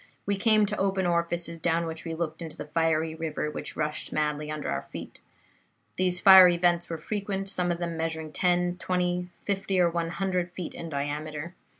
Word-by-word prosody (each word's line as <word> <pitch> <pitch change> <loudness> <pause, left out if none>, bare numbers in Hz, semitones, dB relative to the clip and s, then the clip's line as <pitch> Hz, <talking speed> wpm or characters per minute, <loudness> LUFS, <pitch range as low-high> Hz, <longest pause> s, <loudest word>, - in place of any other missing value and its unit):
We 200 - +1
came 215 +1 +4
to 210 +1 -2
open 195 -1 +1
orifices 170 -1 0
down 170 0 +1
which 160 0 -6
we 165 -1 -3
looked 160 0 -4
into 160 -2 -7
the - - -6
fiery 160 +1 +1
river 160 -1 -3
which - - -6
rushed 150 0 -2
madly 150 0 -1
under 155 -1 -4
our 70 0 -1
feet. 70 - -9 0.8
These 180 -1 +2
fiery 185 -2 +9
vents 175 0 +2
were 165 - -3
frequent, 195 +2 -3
some 180 -2 0
of 170 - -1
them 170 -1 -3
measuring 160 -1 -3
ten, 180 +2 +1
twenty, 180 -1 -1 0.2
fifty 195 -1 0
or 175 -1 +4
one 165 -1 -1
hundred 180 0 -1
feet 180 -3 -6
in 165 - -7
diameter. 150 +3 -4
170 Hz, 190 wpm, -27 LUFS, 160-180 Hz, 0.8 s, fiery